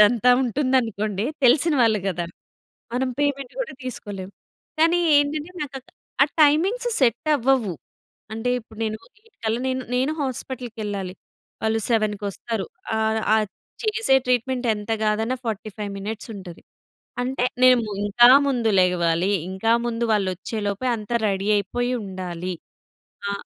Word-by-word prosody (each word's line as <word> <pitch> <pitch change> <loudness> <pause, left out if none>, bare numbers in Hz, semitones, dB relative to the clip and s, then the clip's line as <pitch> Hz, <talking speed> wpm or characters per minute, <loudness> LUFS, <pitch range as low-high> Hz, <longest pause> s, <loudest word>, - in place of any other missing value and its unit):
అదంతా 235 +3 +5
ఉంటుందనుకోండి. 230 -6 0 0.2
తెలిసిన 295 +6 +5
వాళ్ళు 225 -3 +4
గదా! 175 -3 -1 0.7
మనం 260 +1 0
పేమెంట్ 275 -3 -1
గూడా - - -4
తీసుకోలేం. 205 -6 -6 0.5
కానీ 335 +2 +4 0.2
ఏంటంటే 295 +3 +1
నాకక్క 270 -3 -7 0.3
ఆ - - +9 0.2
టైమింగ్స్ 370 +12 +3
సెట్టవ్వవు. 260 - +2 0.6
అంటే 225 +3 -1
ఇప్పుడు 220 -1 -17
నేను 215 0 -2 0.3
8 455 -1 -27
కల్లా 220 +2 0
నేను, 260 0 -1
నేనూ 260 +4 +1
హాస్పిటల్‌కెళ్ళాలి 225 -7 -4 0.5
వాళ్ళు 220 0 +1
సెవెన్‌కొస్తారు. 210 -1 -1 0.3
ఆహ్, 220 0 +1
ఆది 215 -2 +1 0.3
చేసే 430 -10 +3
ట్రీట్‌మెంటెంత 245 -3 0
గాదన్నా 220 +4 +1
45 215 -2 -4
మినిట్సుంటది. 200 -3 -7 0.6
అంటే, 255 0 -1 0.2
నేము 250 -2 +6 0.2
ఇంకా 240 +4 +6 0.2
ముందు 245 -5 +1
లెగవాలీ, 180 0 +2 0.2
ఇంకా 190 +4 0
ముందు 235 0 -1
వాళ్ళొచ్చేలోపే 205 +3 -2
అంతా 215 +2 -4
రెడీ 195 0 -2
అయిపోయుండాలి. 190 -5 -3 0.8
ఆ! - - -1
225 Hz, 115 wpm, -23 LUFS, 205-255 Hz, 0.8 s, ఆ